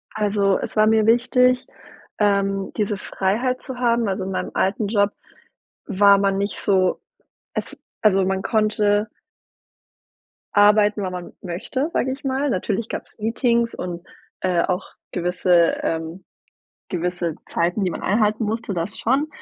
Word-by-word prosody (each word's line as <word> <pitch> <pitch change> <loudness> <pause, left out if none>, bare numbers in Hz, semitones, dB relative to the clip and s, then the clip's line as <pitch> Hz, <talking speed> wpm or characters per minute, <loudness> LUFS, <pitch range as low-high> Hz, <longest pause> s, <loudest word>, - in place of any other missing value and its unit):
Also 205 -2 +2
es - - -6
war 215 0 +4
mir 220 -1 +4
wichtig, 250 +2 +3 0.5
ähm, 195 -1 +1
diese 210 -1 0
Freiheit 230 +8 -1
zu 260 -3 -7
haben 235 -2 +2
also, 190 -1 -2
in 190 - -4
meinem - - -3
alten 200 +2 0
Job 200 -1 +2 0.7
war 200 -1 +5
man 195 0 +1
nicht 200 +1 -2
so 185 -2 +1 0.6
es - - -4 0.3
also, 195 -3 +4
man 190 0 -1
konnte 215 -1 +1 1.5
arbeiten, 205 0 +4
wann 185 - -3
man 180 -1 -7
möchte, 220 - -3
sag - - +1
ich 265 +2 -4
mal. 270 +1 0
Natürlich 210 +1 -2
gab's - - -6
Meetings 235 +1 +1
und, 175 0 -6 0.4
äh, 180 -2 +2
auch 180 +1 -2 0.2
gewisse 180 -1 +2
ähm, 165 +3 -3 0.7
gewisse 175 -2 -2
Zeiten, 175 +4 0
die 185 - 0
man - - -6
einhalten 215 +2 +1
musste, 220 -1 -3
das 175 +5 -3
schon. 275 +6 +1
205 Hz, 140 wpm, -22 LUFS, 185-225 Hz, 1.5 s, war